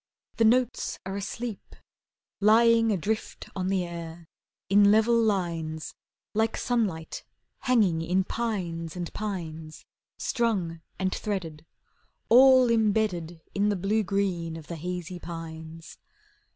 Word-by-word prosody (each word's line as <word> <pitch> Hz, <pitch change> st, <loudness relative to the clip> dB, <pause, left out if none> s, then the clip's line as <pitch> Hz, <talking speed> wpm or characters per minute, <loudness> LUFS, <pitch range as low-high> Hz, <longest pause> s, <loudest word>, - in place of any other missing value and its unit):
The 230 Hz, -, +4 dB
notes 250 Hz, +2 st, +2 dB
are 190 Hz, +1 st, -4 dB
asleep, 200 Hz, +3 st, -6 dB, 0.6 s
Lying 225 Hz, +2 st, +5 dB
adrift 215 Hz, +3 st, -3 dB
on 185 Hz, -1 st, -2 dB
the 190 Hz, -1 st, +1 dB
air 170 Hz, -1 st, -8 dB, 0.4 s
In 200 Hz, +1 st, +6 dB
level 220 Hz, +3 st, +4 dB
lines 170 Hz, -8 st, -1 dB, 0.4 s
Like 220 Hz, +1 st, +1 dB
sunlight 200 Hz, -10 st, -1 dB, 0.4 s
hanging 210 Hz, -11 st, +2 dB
in 180 Hz, +3 st, +1 dB
pines 180 Hz, -8 st, -3 dB
and 175 Hz, -2 st, -5 dB
pines, 165 Hz, -7 st, -6 dB, 0.3 s
Strung 190 Hz, -9 st, -1 dB, 0.2 s
and 185 Hz, -1 st, -1 dB
threaded, 165 Hz, -7 st, -4 dB, 0.6 s
All 255 Hz, 0 st, +7 dB
imbedded 205 Hz, -7 st, +1 dB
In 205 Hz, +1 st, +2 dB
the 205 Hz, -, +1 dB
blue 200 Hz, +4 st, +1 dB
green 180 Hz, -4 st, -1 dB
of 160 Hz, -, -10 dB
the 170 Hz, -, -6 dB
hazy 180 Hz, +1 st, -5 dB
pines. 165 Hz, -1 st, -8 dB
190 Hz, 115 wpm, -27 LUFS, 165-220 Hz, 0.6 s, All